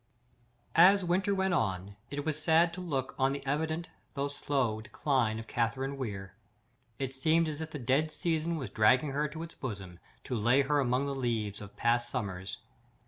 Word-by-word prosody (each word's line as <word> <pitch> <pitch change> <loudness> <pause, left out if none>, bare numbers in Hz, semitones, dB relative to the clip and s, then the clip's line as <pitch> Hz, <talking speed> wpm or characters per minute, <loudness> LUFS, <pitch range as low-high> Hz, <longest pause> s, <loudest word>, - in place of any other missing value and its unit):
As 190 +5 +7
the - - -4
winter 190 +3 +1
went 190 -1 +1
on, 95 - -1
it 145 0 -4
was 155 -1 -2
sad 165 +2 +4
to 185 - -6
look 135 -7 -2
on 135 +1 +3
the 140 0 -6
evident 160 +4 -1 0.3
though 140 0 -1
slow 135 -6 -1
decline 115 -1 0
of 115 - -6
Catherine 130 +5 -1
Weir. 100 -7 -5 0.6
It 135 0 -3
seemed 160 +5 +2
as 155 0 -4
if 160 - -4
the 155 - -6
dead 135 +4 +1
season 165 0 -1
was 130 -9 -5
dragging 125 +7 +4
her 145 +2 0
to 160 +2 -6
its 165 - -9
bosom, 95 -8 -6 0.2
to 125 - -3
lay 120 +5 +4
her 145 +2 +2
among 130 0 +1
the 140 - -2
leaves 115 -6 -2
of 105 -1 -11
past 120 0 +2
summers. 95 -6 -4
135 Hz, 190 wpm, -31 LUFS, 115-155 Hz, 0.6 s, As